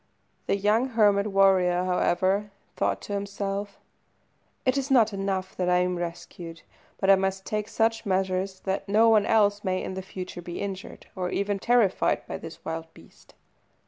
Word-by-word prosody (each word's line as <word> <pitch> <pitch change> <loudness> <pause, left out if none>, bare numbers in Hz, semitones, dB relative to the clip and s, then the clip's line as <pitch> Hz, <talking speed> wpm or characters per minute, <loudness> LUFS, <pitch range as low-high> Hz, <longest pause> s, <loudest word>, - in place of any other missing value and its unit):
The - - +2
young 210 +5 +2
hermit 210 -4 +3
warrior, 190 -3 +3
however, 185 +3 +1 0.3
thought - - -1
to 205 - -5
himself 200 0 -4 0.9
"It 255 0 +3
is 275 0 -1
not 230 -5 +4
enough 195 -1 -3
that 180 -1 0
I 180 - +4
am 180 0 +1
rescued, 170 -1 -7 0.4
but 195 0 +4
I - - +8
must 190 0 -2
take 210 0 -2
such 225 0 0
measures 190 -1 -1
that 195 +1 -3
no 220 +3 +5
one 215 -2 +4
else 205 -2 +3
may 185 -2 -1
in - - -4
future 185 -1 -7
be 175 0 -7
injured, 195 -1 -6
or 180 -2 -2
even 200 +1 -1
terrified 235 -3 +2
by - - -6
this 165 0 -10
wild 160 0 -5
beast." 85 - -19
195 Hz, 165 wpm, -26 LUFS, 185-210 Hz, 0.9 s, I